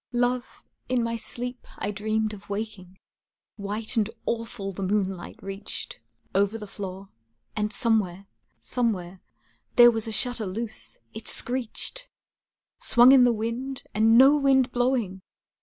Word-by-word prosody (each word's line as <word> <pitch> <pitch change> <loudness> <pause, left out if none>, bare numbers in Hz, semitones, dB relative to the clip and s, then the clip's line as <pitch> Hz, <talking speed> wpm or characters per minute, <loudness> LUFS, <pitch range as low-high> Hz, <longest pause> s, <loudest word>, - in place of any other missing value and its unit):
Love, 245 0 -1 0.3
in 250 -2 +1
my 230 0 -1
sleep 245 +2 -4
I 200 - -2
dreamed 215 +1 -1
of 205 -1 -12
waking, 200 -3 -6 0.6
White 210 +3 -3
and 215 -1 +2 0.2
awful 230 -3 -3
the 195 - -7
moonlight 190 -2 -2
reached 195 +1 -6 0.3
Over 200 +3 +2
the 215 - -8
floor, 195 -1 -7 0.5
and 210 -1 -1
somewhere, 205 -5 +1 0.3
somewhere, 190 -7 -2 0.5
There 240 0 +9
was 225 -1 -2
a - - -3
shutter 235 -1 +1
loose, 220 +4 -5 0.2
it 220 0 -7
screeched! 260 - 0 0.7
Swung 240 +2 +7
in 260 -2 +7
the 245 - +4
wind, 235 +4 -3
and 225 +1 +5
no 270 +3 +8
wind 270 -3 +3
blowing! 240 -7 0
220 Hz, 135 wpm, -26 LUFS, 200-245 Hz, 0.7 s, There